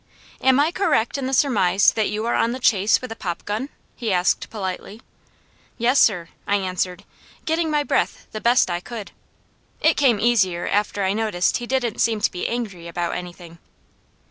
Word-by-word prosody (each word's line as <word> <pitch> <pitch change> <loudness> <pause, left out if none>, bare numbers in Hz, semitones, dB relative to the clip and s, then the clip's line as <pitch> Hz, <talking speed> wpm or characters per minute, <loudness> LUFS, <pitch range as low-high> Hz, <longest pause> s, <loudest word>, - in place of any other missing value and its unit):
"Am 265 +1 +4
I 300 +3 +3
correct 350 - +1
in 260 - -2
the - - -3
surmise 210 -8 +3
that 220 -2 0
you 215 +2 -3
are 235 - 0
on 235 - +1
the 255 - -5
chase 210 -4 +3
with 255 - -6
a - - -5
popgun?" 205 +8 -4 0.3
he 225 -3 -3
asked 180 -1 +1
politely. 200 0 -5 0.8
"Yes 250 +4 +3
sir," 175 -6 +3 0.2
I 205 - +2
answered, 185 -2 -2 0.4
getting 325 0 0
my 300 -1 +1
breath - - -1
the 215 - -6
best 235 -5 +3
I 175 - -1
could. 215 +2 -8 0.7
It - - +3
came 250 -7 +3
easier 200 -7 +2
after 205 0 0
I 190 +1 +1
noticed 210 -5 0
he 240 - -7
didn't 245 -4 -1
seem 225 -2 +2
to - - +1
be 180 - -3
angry 205 -8 -4
about 170 0 -3
anything. 175 -1 -9
215 Hz, 180 wpm, -22 LUFS, 185-245 Hz, 0.8 s, Am